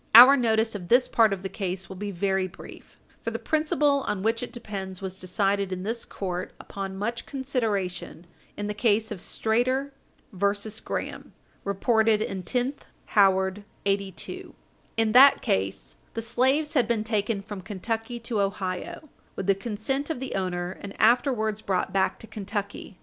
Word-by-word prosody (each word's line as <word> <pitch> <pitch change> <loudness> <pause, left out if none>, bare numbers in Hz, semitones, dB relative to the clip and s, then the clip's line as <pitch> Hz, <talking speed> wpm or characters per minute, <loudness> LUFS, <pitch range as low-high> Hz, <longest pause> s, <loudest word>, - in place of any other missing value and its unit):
Our 255 +4 +12
notice 225 -3 +2
of 185 -4 -6
this 245 +4 +5
part 225 -2 +4
of 195 -1 -3
the - - -1
case 190 -1 -4
will 190 - -8
be 205 +2 -4
very 190 0 0
brief, 185 - -13 0.2
for - - -2
the - - -3
principle 300 -2 +2
on 195 -2 -1
which 225 +1 +1
it 245 - -5
depends 195 -6 -6
was 190 -1 -6
decided 195 +1 0
in 185 0 -3
this 225 +3 -2
court, 180 -2 -4
upon 195 -1 -6
much 230 +4 -3
consideration, 220 - -2 0.3
in 205 - -3
the 210 - -2
case 220 0 +2
of 205 - -4
Strader 255 +9 0 0.4
et 180 - -12
al. 200 0 +5
v. 205 +1 -6
Graham, - - -5 0.3
reported 220 +2 +3
in 195 -3 -3
10th 250 +8 -1 0.3
Howard 190 0 +4 0.2
82. 195 -1 -3 0.4
In 225 -1 +3
that 270 +4 +8
case, 95 +1 -1 0.2
the 225 - -1
slaves 265 +7 +2
had 250 -7 +3
been 225 -2 +1
taken 210 -2 -1
from 205 -2 -7
Kentucky 225 +4 -4
to 230 -3 -1
Ohio, 200 - -3 0.3
with 195 - -4
the 200 - +5
consent 230 - -2
of 320 - -2
the 265 0 -4
owner, 180 -1 -2
and 200 0 -9
afterwards 220 -2 +3
brought 190 -3 -1
back 190 -1 +2
to - - -9
Kentucky. 205 -2 -5
210 Hz, 170 wpm, -26 LUFS, 195-235 Hz, 0.4 s, Our